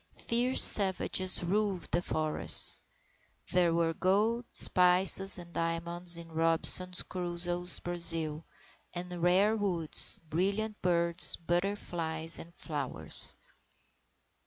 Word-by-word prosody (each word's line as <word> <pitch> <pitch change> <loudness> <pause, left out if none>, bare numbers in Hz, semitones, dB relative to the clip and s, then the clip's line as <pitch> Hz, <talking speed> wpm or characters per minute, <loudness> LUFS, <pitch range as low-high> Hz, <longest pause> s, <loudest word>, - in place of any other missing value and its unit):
Fierce 245 +3 +2
savages 190 -2 +5
roved 195 0 -5
the 175 - -3
forests. 155 -2 +4 0.7
There 180 -2 -1
were 165 0 -3
gold, 210 +7 -3
spices, 185 +2 +3
and 170 -1 -15
diamonds 170 +1 +1
in 165 -1 -14
Robinson 165 +3 +1 0.2
Crusoe's 175 0 -6
Brazils, 165 -3 -3 0.5
and 175 0 -10
rare 190 +5 -1
woods, 180 -7 -2
brilliant 200 +6 -6
birds, 170 -1 +2
butterflies, 170 -3 -7
and 170 - -15
flowers. 135 - -3
175 Hz, 95 wpm, -27 LUFS, 165-190 Hz, 0.7 s, savages